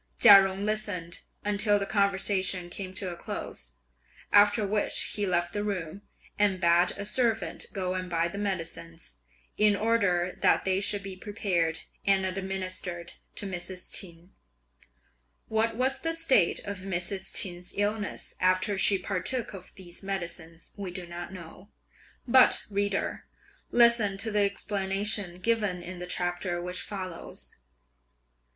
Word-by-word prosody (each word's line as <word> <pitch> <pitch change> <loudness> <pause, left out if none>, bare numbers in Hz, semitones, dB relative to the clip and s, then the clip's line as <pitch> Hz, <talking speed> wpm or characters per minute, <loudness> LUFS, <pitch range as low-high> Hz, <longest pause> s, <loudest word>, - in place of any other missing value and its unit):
Chia 200 -4 +10
Jung 195 +1 -2
listened 205 -6 -1 0.3
until 205 0 +3
the 200 - -1
conversation 190 -3 0
came 190 0 -5
to 185 -1 -3
a - - -6
close, - - -6 0.6
after 205 +1 +6
which 205 +1 0
he 205 -1 -1
left 175 -1 0
the 205 - -1
room, 195 -3 -4 0.4
and 200 -3 +3
bade 175 0 +4
a 200 - -4
servant 225 0 +1
go 185 -2 -2
and 185 -1 -4
buy 170 -1 +1
the 200 +4 -6
medicines, 165 -4 -4 0.4
in 210 -1 +5
order 200 -5 +1
that - - +4
they 190 0 +2
should 200 0 0
be 195 -1 -6
prepared 185 -5 -1 0.2
and 195 -1 +3
administered 185 -2 -4 0.2
to - - -4
Mrs. 180 -1 -2
Ch'in. 175 0 -3 1.2
What 220 +1 +1
was 260 +3 0
the 330 0 -1
state 265 - +3
of 200 -2 -5
Mrs. 190 0 -2
Ch'in's 180 -1 -3
illness, 205 0 -2
after 185 +2 +2
she 195 - +5
partook 200 +6 -3
of 185 -2 -9
these 175 -2 -11
medicines, 170 -4 -5
we 200 -2 -5
do 180 0 -6
not 175 +1 -7
know; 185 +2 -11 0.6
but, 255 +1 +6
reader, 200 0 -1 0.4
listen 235 -4 +5
to 220 +3 -2
the 210 0 +3
explanation 200 -1 -1
given 210 -5 0
in 180 0 -7
the 180 - -6
chapter 175 0 -2
which 180 +2 -4
follows. 185 -4 -7
195 Hz, 140 wpm, -28 LUFS, 180-205 Hz, 1.2 s, Chia